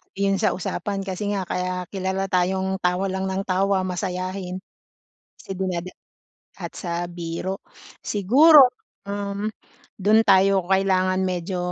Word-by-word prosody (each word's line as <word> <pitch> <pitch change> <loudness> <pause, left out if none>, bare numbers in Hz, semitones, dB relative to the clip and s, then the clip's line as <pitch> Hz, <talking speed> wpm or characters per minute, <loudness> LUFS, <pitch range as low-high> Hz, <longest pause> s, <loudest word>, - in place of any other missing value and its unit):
Yung 195 0 +1
sa 220 - +1
usapan 195 +2 -3
kasi 195 +2 -4
nga, 190 - -1
kaya 180 0 -3
kilala 190 0 -2
tayong 190 +1 0
tawa 180 +1 0
lang 190 0 -2
nang 190 +1 -2
tawa, 190 0 +1
masayahin. 185 0 -4 0.7
Kasi - - -16
dinada 185 -1 -3 0.6
at - - -7
sa 175 -1 -3
biro. 175 +2 -4 0.4
Siguro, 260 - +6 0.3
um, 200 +1 -3 0.5
dun 215 +3 +4
tayo 195 -2 +4
kailangan 185 -1 +2
medyo 180 0 -3
190 Hz, 125 wpm, -23 LUFS, 185-195 Hz, 0.7 s, Siguro